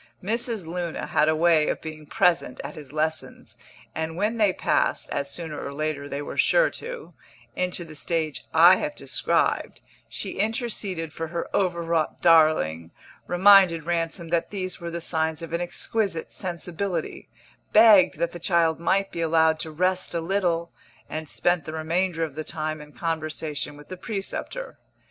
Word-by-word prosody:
Mrs. 230 Hz, -1 st, -1 dB
Luna 170 Hz, 0 st, -4 dB
had 150 Hz, +1 st, +2 dB
a 155 Hz, -, +2 dB
way 160 Hz, -1 st, +4 dB
of -, -, -1 dB
being 155 Hz, -1 st, -9 dB
present 180 Hz, -, +1 dB
at 140 Hz, +2 st, -6 dB
his 145 Hz, -4 st, -11 dB
lessons, 155 Hz, +1 st, -3 dB, 0.4 s
and 160 Hz, 0 st, -3 dB
when 210 Hz, +4 st, 0 dB
they 210 Hz, -3 st, +4 dB
passed, -, -, 0 dB
as 140 Hz, 0 st, -2 dB
sooner 160 Hz, 0 st, -4 dB
or 140 Hz, -, -5 dB
later 145 Hz, -1 st, -3 dB
they 140 Hz, +1 st, -4 dB
were -, -, -7 dB
sure -, -, +4 dB
to, 485 Hz, -1 st, -8 dB, 0.4 s
into 180 Hz, -1 st, -1 dB
the 160 Hz, -, -11 dB
stage 155 Hz, 0 st, -2 dB
I 175 Hz, +3 st, +7 dB
have 300 Hz, -1 st, -3 dB
described, -, -, 0 dB, 0.3 s
she -, -, -5 dB
interceded 205 Hz, -7 st, -2 dB
for 165 Hz, +1 st, -4 dB
her 170 Hz, +1 st, -4 dB
overwrought 170 Hz, -4 st, 0 dB
darling, 155 Hz, -, +4 dB, 0.4 s
reminded 185 Hz, -2 st, +6 dB
Ransom 170 Hz, 0 st, -2 dB
that 170 Hz, 0 st, 0 dB
these 185 Hz, -2 st, -4 dB
were 170 Hz, -, -4 dB
the 170 Hz, 0 st, -5 dB
signs 160 Hz, -1 st, -1 dB
of 165 Hz, -, -7 dB
an 170 Hz, -, 0 dB
exquisite 185 Hz, 0 st, -2 dB
sensibility, 180 Hz, +1 st, -4 dB, 0.4 s
begged 210 Hz, -7 st, +7 dB
that 170 Hz, +1 st, -1 dB
the 175 Hz, -, -8 dB
child 165 Hz, -2 st, +2 dB
might 195 Hz, +3 st, +1 dB
be 170 Hz, -, -4 dB
allowed 160 Hz, -1 st, +3 dB
to 160 Hz, -, -4 dB
rest 185 Hz, +2 st, 0 dB
a -, -, +1 dB
little, 170 Hz, -1 st, 0 dB, 0.4 s
and 155 Hz, -1 st, -4 dB
spent 175 Hz, -4 st, +1 dB
the 155 Hz, -, -6 dB
remainder 165 Hz, +2 st, 0 dB
of 155 Hz, -4 st, -3 dB
the 155 Hz, +2 st, -5 dB
time 155 Hz, -1 st, -4 dB
in 150 Hz, 0 st, -12 dB
conversation 155 Hz, -2 st, -3 dB
with 150 Hz, -, -15 dB
the 185 Hz, -, -6 dB
preceptor. 220 Hz, -, -5 dB
170 Hz, 165 wpm, -25 LUFS, 155-185 Hz, 0.4 s, I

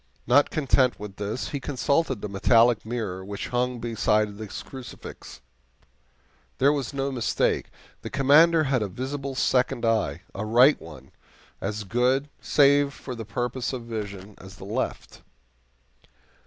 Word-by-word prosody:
Not 140 Hz, +4 st, +4 dB
content 135 Hz, -4 st, +2 dB
with 105 Hz, -1 st, -8 dB
this, 105 Hz, +4 st, -3 dB
he 140 Hz, -, -3 dB
consulted 135 Hz, -2 st, 0 dB
the -, -, -3 dB
metallic 115 Hz, +3 st, +3 dB
mirror 105 Hz, -6 st, -4 dB
which 100 Hz, +1 st, -6 dB
hung 125 Hz, 0 st, 0 dB
beside 110 Hz, -2 st, +1 dB
his 105 Hz, 0 st, -8 dB
crucifix. 130 Hz, -2 st, -10 dB, 1.2 s
There 140 Hz, +3 st, +4 dB
was 140 Hz, -4 st, -3 dB
no 140 Hz, 0 st, -2 dB
mistake; 120 Hz, -4 st, 0 dB, 0.3 s
the -, -, -6 dB
Commander 155 Hz, +4 st, +5 dB
had 135 Hz, -4 st, +1 dB
a 105 Hz, -, -1 dB
visible 135 Hz, +6 st, -5 dB
second 125 Hz, -1 st, +1 dB
eye 105 Hz, -9 st, 0 dB
a 100 Hz, -, -4 dB
right 120 Hz, +7 st, +5 dB
one 75 Hz, -5 st, -12 dB, 0.5 s
as 105 Hz, +2 st, -3 dB
good, 125 Hz, +7 st, +1 dB
save 140 Hz, -1 st, +3 dB
for 130 Hz, -, -7 dB
the 115 Hz, -2 st, -7 dB
purposes 120 Hz, +4 st, -3 dB
of 125 Hz, -2 st, -5 dB
vision, 105 Hz, -3 st, -6 dB
as 95 Hz, +1 st, -12 dB
the 95 Hz, -, -11 dB
left. 115 Hz, +6 st, -4 dB
120 Hz, 140 wpm, -25 LUFS, 105-135 Hz, 1.2 s, Commander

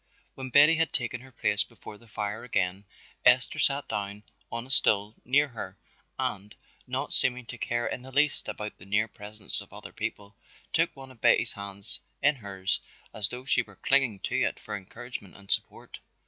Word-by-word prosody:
When 130 Hz, -1 st, -7 dB
Betty 145 Hz, +5 st, +7 dB
had 165 Hz, 0 st, +1 dB
taken 120 Hz, -1 st, 0 dB
her 130 Hz, 0 st, -14 dB
place -, -, +2 dB
before 105 Hz, -, -12 dB
the 115 Hz, -, -17 dB
fire 105 Hz, +1 st, -4 dB
again 100 Hz, -4 st, -1 dB, 0.4 s
Esther 125 Hz, 0 st, +5 dB
sat 140 Hz, 0 st, +2 dB
down 100 Hz, 0 st, -4 dB, 0.3 s
on 115 Hz, +1 st, -3 dB
a 130 Hz, -, -5 dB
stool 105 Hz, -4 st, +5 dB
near 145 Hz, +4 st, +3 dB
her 115 Hz, -4 st, -7 dB, 0.4 s
and, 100 Hz, +2 st, -3 dB, 0.3 s
not 130 Hz, +3 st, -2 dB
seeming 125 Hz, -1 st, +3 dB
to 120 Hz, -, -7 dB
care 120 Hz, +2 st, -1 dB
in -, -, -3 dB
the 130 Hz, +1 st, -11 dB
least 145 Hz, +2 st, +2 dB
about 105 Hz, 0 st, -6 dB
the 85 Hz, -, -12 dB
near 105 Hz, +2 st, +2 dB
presence 105 Hz, -1 st, -5 dB
of -, -, -13 dB
other -, -, -10 dB
people, 100 Hz, 0 st, -5 dB, 0.4 s
took 165 Hz, +1 st, +2 dB
one 135 Hz, -1 st, -11 dB
of 120 Hz, -, -18 dB
Betty's -, -, +5 dB
hands 100 Hz, 0 st, +1 dB, 0.2 s
in 145 Hz, 0 st, +4 dB
hers 95 Hz, -4 st, -2 dB, 0.3 s
as 105 Hz, -2 st, +2 dB
though 125 Hz, +1 st, -7 dB
she 130 Hz, -, +3 dB
were 105 Hz, -4 st, -13 dB
clinging 130 Hz, -3 st, +2 dB
to -, -, -1 dB
it -, -, 0 dB
for 105 Hz, -, -6 dB
encouragement 105 Hz, +1 st, -8 dB
and 100 Hz, -1 st, -8 dB
support. -, -, -1 dB
115 Hz, 190 wpm, -28 LUFS, 100-130 Hz, 0.4 s, Betty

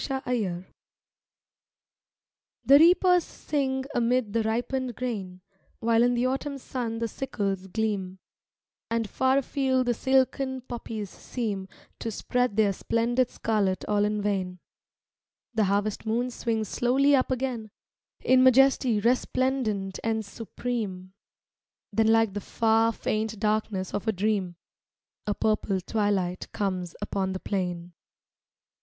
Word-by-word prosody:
Httermatb 230 Hz, -10 st, -2 dB, 2.0 s
HE 275 Hz, -, +7 dB
reapers 355 Hz, +3 st, +6 dB
sing 265 Hz, -4 st, -2 dB
amid 240 Hz, -2 st, +1 dB
the 230 Hz, -, +2 dB
ripened 245 Hz, +3 st, -2 dB
grain, 195 Hz, -8 st, -4 dB, 0.4 s
While 230 Hz, 0 st, +2 dB
in 245 Hz, 0 st, +3 dB
the 240 Hz, +1 st, +1 dB
Autumn 270 Hz, +2 st, -2 dB
sun 245 Hz, -3 st, -4 dB
the 230 Hz, 0 st, -1 dB
sickles 200 Hz, -6 st, -3 dB
gleam, 195 Hz, -2 st, -2 dB, 0.7 s
And 230 Hz, -1 st, 0 dB
far 260 Hz, +5 st, +2 dB
afield 265 Hz, -1 st, +1 dB
the 240 Hz, -, +2 dB
silken 265 Hz, +1 st, +1 dB
poppies 225 Hz, -5 st, -6 dB
seem 205 Hz, -6 st, -4 dB, 0.3 s
To 230 Hz, -, -3 dB
spread 245 Hz, 0 st, -1 dB
their 205 Hz, -2 st, +4 dB
splendid 240 Hz, +5 st, 0 dB
scarlet 200 Hz, -4 st, -1 dB
all 205 Hz, 0 st, +2 dB
in 210 Hz, 0 st, 0 dB
vain; 190 Hz, -3 st, -1 dB, 1.0 s
The 220 Hz, -2 st, +2 dB
harvest 200 Hz, +2 st, 0 dB
moon 240 Hz, +3 st, 0 dB
swings 225 Hz, -3 st, -2 dB
slowly 270 Hz, +6 st, +3 dB
up 260 Hz, -, +1 dB
again 250 Hz, -4 st, -2 dB, 0.5 s
In 255 Hz, 0 st, +4 dB
majesty 260 Hz, -3 st, +5 dB
resplendent 235 Hz, -4 st, 0 dB
and 220 Hz, -1 st, -1 dB
supreme. 200 Hz, -3 st, -5 dB, 0.8 s
Then 225 Hz, 0 st, +3 dB
like 225 Hz, -2 st, +4 dB
the 205 Hz, -, -3 dB
far, 225 Hz, +1 st, +2 dB
faint 220 Hz, -1 st, -2 dB
darkness 210 Hz, -3 st, -1 dB
of 205 Hz, +2 st, -3 dB
a -, -, +4 dB
dream, 195 Hz, -3 st, -1 dB, 0.7 s
A 210 Hz, -, 0 dB
purple 215 Hz, -2 st, 0 dB
twilight 195 Hz, -2 st, -1 dB
comes 185 Hz, -5 st, -3 dB
upon 190 Hz, -2 st, -2 dB
the 190 Hz, -, -4 dB
plain. 180 Hz, -3 st, -3 dB
225 Hz, 125 wpm, -27 LUFS, 200-250 Hz, 2.0 s, HE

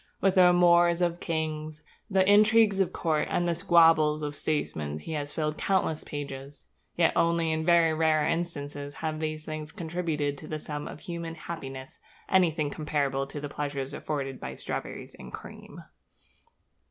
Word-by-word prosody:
With 195 Hz, 0 st, +3 dB
the 185 Hz, -2 st, +7 dB
amours 175 Hz, -1 st, +5 dB
of 175 Hz, 0 st, 0 dB
kings, 155 Hz, -2 st, -3 dB, 0.3 s
the 190 Hz, -1 st, +3 dB
intrigues 210 Hz, 0 st, +5 dB
of 190 Hz, -, +2 dB
courts, 155 Hz, -3 st, 0 dB
and 175 Hz, -, +1 dB
the 170 Hz, -, +2 dB
squabbles 165 Hz, -4 st, +4 dB
of 145 Hz, 0 st, -3 dB
statesmen 80 Hz, -, -2 dB
he 75 Hz, -, -8 dB
has 145 Hz, -1 st, -3 dB
filled 155 Hz, 0 st, -2 dB
countless 185 Hz, -5 st, 0 dB
pages; 140 Hz, -1 st, -7 dB, 0.3 s
yet 170 Hz, -1 st, +3 dB
only 165 Hz, -1 st, +2 dB
in 160 Hz, 0 st, -1 dB
very 170 Hz, -1 st, +4 dB
rare 155 Hz, -1 st, +2 dB
instances 145 Hz, -4 st, -3 dB
have 155 Hz, 0 st, -3 dB
these 155 Hz, -1 st, -3 dB
things 155 Hz, 0 st, -6 dB
contributed 160 Hz, -5 st, -2 dB
to 155 Hz, -, -10 dB
the 155 Hz, -, -3 dB
sum 150 Hz, -1 st, -6 dB
of -, -, -9 dB
human 170 Hz, -2 st, -5 dB
happiness 135 Hz, -5 st, -8 dB, 0.3 s
anything 160 Hz, -6 st, +2 dB
comparable 140 Hz, -3 st, -1 dB
to 145 Hz, -, -7 dB
the 145 Hz, -, -4 dB
pleasures 140 Hz, -2 st, -4 dB
afforded 135 Hz, -3 st, -4 dB
by 65 Hz, 0 st, -6 dB
strawberries -, -, -6 dB
and -, -, -10 dB
cream. -, -, -10 dB
155 Hz, 160 wpm, -28 LUFS, 145-170 Hz, 0.3 s, the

